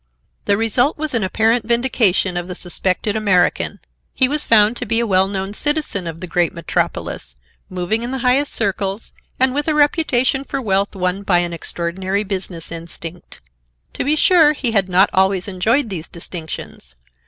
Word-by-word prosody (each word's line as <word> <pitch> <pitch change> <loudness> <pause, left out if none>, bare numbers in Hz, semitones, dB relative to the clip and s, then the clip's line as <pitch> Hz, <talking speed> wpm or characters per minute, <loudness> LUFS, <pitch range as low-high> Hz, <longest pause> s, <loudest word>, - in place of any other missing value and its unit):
The 200 - +2
result 235 +6 +1
was 310 -2 -3
an 230 - +1
apparent 220 +4 +1
vindication 235 -6 +2
of 175 0 -3
the 180 - -6
suspected 185 +3 -2
American. 190 -5 +1 0.4
He 260 - +5
was 295 +2 +1
found 215 0 +4
to 245 - -4
be 225 +2 +2
a 235 - +1
well 190 -2 +3
known 195 0 -3
citizen 290 - -1
of 165 0 -7
the - - -4
great 175 0 0
metropolis, 170 - -3 0.3
moving 185 +5 -1
in 240 - -3
the 265 - -3
highest 270 +3 +3
circles 195 +1 -2 0.3
and 260 0 +3
with 290 +2 -2
a 310 - +1
reputation 275 -3 +2
for 275 0 -4
wealth 200 -4 0
won 185 +1 -1
by 195 -3 +2
an 175 -1 0
extraordinary 185 +4 -2
business 185 -5 -5
instinct. 165 +1 -8 0.5
To - - -3
be 295 +3 +1
sure, 315 -2 +5
he 260 -5 0
had 195 -4 +1
not 185 +2 +4
always 190 0 +2
enjoyed 220 +7 0
these 170 -4 -5
distinctions. 160 - -8
200 Hz, 175 wpm, -19 LUFS, 180-245 Hz, 0.5 s, He